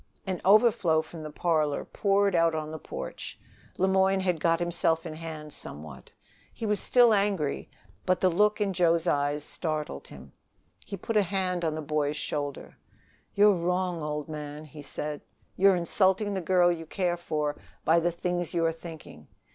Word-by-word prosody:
An 185 -2 -3
overflow 195 -6 +4
from 160 0 -10
the 155 - -6
parlor 155 -3 0
poured 200 -1 +1
out 165 -1 +3
on 155 -1 -4
the 160 - -6
porch. - - -7 0.4
Le 190 - +2
Moyne 190 0 +3
had 180 -3 0
got 165 +1 +2
himself 170 -1 +1
in 160 - -5
hand 155 -2 -7
somewhat. 75 -2 -9 0.4
He 225 - -6
was 210 -1 +1
still 245 -3 +5
angry, 195 -8 0 0.4
but 185 - +3
the 185 - +4
look 210 +5 +2
in 200 -2 0
Joe's 170 -2 +2
eyes 145 -2 0
startled 155 - -4
him. 65 +1 -12 0.6
He 200 - -5
put 215 +4 -2
a - - +6
hand 185 -2 -1
on 160 -2 0
the 155 - -4
boy's 150 0 -1
shoulder. 145 -1 -4 0.6
"You're 205 0 +6
wrong, 180 -1 -1
old 150 -1 -3
man," 150 -1 -7
he 150 0 -11
said. 150 +1 -5 0.3
"You're 195 0 +5
insulting 190 +3 +2
the 190 - -2
girl 175 0 +4
you 165 -2 -5
care 175 0 0
for 150 -4 -2 0.3
by 165 +1 +5
the 175 +1 +1
things 175 0 -3
you 165 -1 +2
are 165 - +2
thinking. 160 - -11
170 Hz, 175 wpm, -28 LUFS, 155-190 Hz, 0.6 s, a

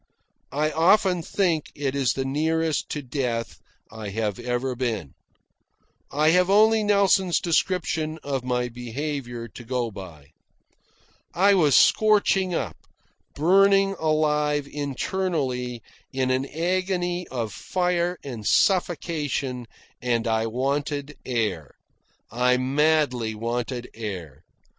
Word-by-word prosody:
I 155 +1 +1
often 180 +2 +3
think 170 -3 0
it 140 -1 -2
is 135 -3 +1
the 135 - -3
nearest 160 +3 0
to 150 - -4
death 120 -3 -3 0.3
I 110 -2 -7
have 105 0 -2
ever 125 +1 -2
been. 110 - -3 1.0
I 150 +2 +3
have 180 +1 +3
only 215 +2 +5
Nelson's 200 -3 +3
description 165 -2 0
of 135 -3 -2
my 125 -1 -1
behaviour 120 0 -5
to 120 - -11
go 120 -1 -2
by. 85 -7 -11 1.0
I 200 +3 +5
was 155 -8 +4
scorching 200 -3 +4
up, - - -3 0.6
burning 195 +4 +4
alive 150 -2 +1
internally, 140 - -2 0.3
in 130 -1 0
an 130 +2 0
agony 180 +1 -1
of 115 -6 -4
fire 180 - -1
and 120 -6 -7
suffocation, 150 - 0 0.3
and 120 -2 0
I 110 0 +1
wanted 140 +4 -2
air. 105 - -2 0.6
I 125 +2 +2
madly 130 -4 +1
wanted 120 +2 -3
air. 95 - -7
140 Hz, 110 wpm, -24 LUFS, 120-170 Hz, 1.0 s, only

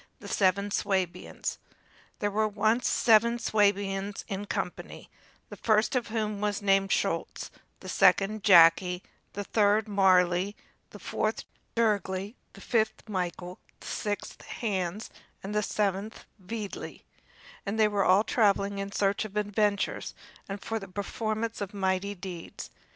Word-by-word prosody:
The - - -10
Seven 200 +1 +1
Swabians 185 -3 -2 0.6
There 205 - -1
were 215 +1 +1
once 215 +3 +1
seven 235 +1 +4
Swabians 200 -3 0
in 200 +1 -4
company, - - -5 0.4
the - - -9
first 220 +3 +2
of 245 -2 0
whom 215 -2 -2
was 205 -1 0
named 195 -1 +2
Schulz, - - -1 0.3
the - - -10
second 205 +1 +3
Jacky, 180 -1 +6 0.3
the 205 - -4
third 210 +1 +2
Marli, 190 -1 +3 0.3
the - - -11
fourth - - -2 0.3
Jergli, 205 -3 0 0.2
the - - -13
fifth 220 -1 0
Michael, 180 -2 -4 0.2
the - - -14
sixth 205 -1 -4
Hans, 200 -2 -3 0.3
and 195 +2 -5
the 210 - +2
seventh 205 +1 -2 0.2
Veitli; 210 +1 -6 0.6
and 210 +2 -3
they 215 - +6
all 200 -2 +3
were 205 - +3
traveling 200 -3 +1
in 195 0 -4
search 200 +1 +1
of 210 -1 -7
adventures, 205 -1 0 0.3
and 195 +1 -4
for 225 +2 -3
the 195 - -9
performance 215 +4 -3
of 200 +1 -5
mighty 190 +1 -1
deeds. 180 -3 -8
205 Hz, 135 wpm, -28 LUFS, 195-215 Hz, 0.6 s, Jacky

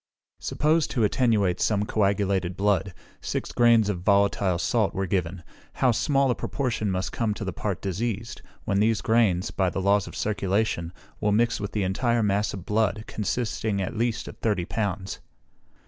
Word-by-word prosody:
Suppose 155 +1 +1
to 120 - -1
attenuate 105 -5 +2
some 105 -1 +1
coagulated 100 -4 0
blood, 100 -1 +1 0.3
six - - -3
grains 115 -3 +4
of 100 -4 -1
volatile 100 -1 +2
salt 105 +2 0
were 95 0 0
given, 90 -2 -2 0.3
how 130 -2 +2
small 135 +3 +2
a - - +3
proportion 120 -5 -2
must 95 0 -2
come 110 -3 -1
to 105 - -5
the 95 - -3
part 100 -5 -3
diseased, 115 +5 -3 0.2
when 100 -3 +1
these 110 0 +2
grains, 110 -7 +2
by 95 -2 +1
the 95 - -3
laws 100 +1 +2
of - - -9
circulation, 100 -4 -1 0.3
will 105 - +1
mix 115 +3 +2
with 100 -1 -5
the 105 - 0
entire 115 +5 +1
mass 105 0 +1
of 95 -2 -7
blood, 105 -1 0
consisting 110 0 -2
at 105 +5 -3
least 120 +1 -1
of - - -9
thirty 100 -6 0
pounds! 100 -2 -3
105 Hz, 170 wpm, -26 LUFS, 95-115 Hz, 0.3 s, grains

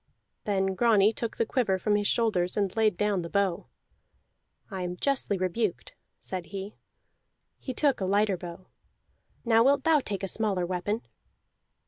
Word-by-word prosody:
Then 195 -2 +1
Grani 215 0 +4
took 230 0 -4
the 230 - +1
quiver 215 -5 +1
from 205 +2 +1
his 205 0 +1
shoulders 200 -6 +1
and 200 -1 0
laid 215 -5 +2
down 205 -2 +1
the 170 - -6
bow. 195 -3 0 1.0
"I 190 -1 -4
am 180 0 -4
justly 265 -6 0
rebuked," 185 +2 -2 0.2
said 180 -3 -6
he. 195 +4 -6 0.9
He 260 - -6
took 280 -7 +2
a - - 0
lighter 200 +1 +2
bow. 175 +1 -9 0.8
"Now 230 -1 +5
wilt 275 +1 +3
thou 320 -2 +4
take 200 -7 -4
a - - -1
smaller 195 -3 -1
weapon?" 185 +6 -2
205 Hz, 155 wpm, -28 LUFS, 185-225 Hz, 1.0 s, Now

